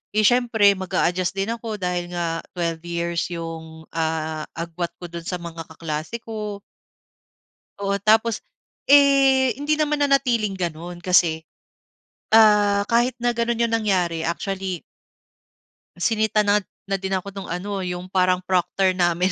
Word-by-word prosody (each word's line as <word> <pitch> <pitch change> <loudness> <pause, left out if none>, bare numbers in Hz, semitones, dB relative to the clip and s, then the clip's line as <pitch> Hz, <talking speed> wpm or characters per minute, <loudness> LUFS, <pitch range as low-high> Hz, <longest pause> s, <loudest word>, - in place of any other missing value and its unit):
'di 215 - +3
siyempre 230 -3 +4
mag-aadjust 185 -1 -1
din 195 +3 -1
ako 230 -2 -4
dahil 180 -3 -2
nga 165 -1 -1 0.2
12 170 0 -2
yung, 165 -2 -7
ah, 160 -1 -2
agwat 170 +1 -4
ko 175 -1 -10
do'n 170 0 -7
sa 180 - -2
mga 165 -1 -8
kaklase 160 +4 -5
ko. 210 -2 -5 1.2
Oo 200 0 -1
tapos 220 +1 +3 0.5
eh, 275 -3 +6
hindi 290 +4 -1
naman 300 -1 0
nanatiling 245 -8 +2
gano'n 175 0 -4
kasi, 170 -3 +3 0.9
ah, 210 -2 +6
kahit 240 +2 +3
na 240 0 +1
ganun 235 0 0
'yun 235 - +2
nangyari 180 -7 0
actually 190 +1 -3 1.1
Sinita 215 +3 +1
na, 205 0 +3 0.3
na 195 - +1
'din 190 0 -2
ako 195 +2 -4
nung 195 -1 -7
ano 195 +3 -4
'yung 180 +1 -5
parang 185 -1 +2
Proctor 185 +1 +1
namin, 175 +1 +2
190 Hz, 135 wpm, -23 LUFS, 170-220 Hz, 1.2 s, eh